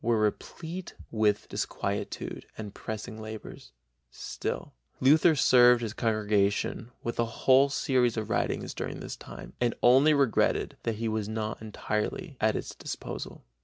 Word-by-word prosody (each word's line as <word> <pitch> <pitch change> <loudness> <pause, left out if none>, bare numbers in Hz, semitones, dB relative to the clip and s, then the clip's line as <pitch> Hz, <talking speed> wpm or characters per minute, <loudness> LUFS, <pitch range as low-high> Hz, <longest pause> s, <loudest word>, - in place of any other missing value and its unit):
were 115 0 +2
replete 165 - -3 0.2
with 105 -2 +1
disquietude - - -3
and 105 -2 -6
pressing 110 +1 -6
labors; 110 -9 -9 0.4
still - - -5 0.3
Luther 155 +4 +5
served 125 -3 +6
his 110 -2 -3
congregation 110 0 0
with 120 - -4
a 120 - +3 0.2
whole 135 +1 +6
series 125 -4 +1
of 110 -2 -2
writings - - -1
during - - -5
this - - -6
time, - - -10
and 120 -1 +2
only 135 +5 +6
regretted 140 -5 +2
that 115 - -1
he 115 +2 -2
was 110 -1 -2
not 110 0 -3
entirely 110 - -3
at 110 0 +3
its - - -4
disposal. - - -6
115 Hz, 140 wpm, -29 LUFS, 110-130 Hz, 0.4 s, served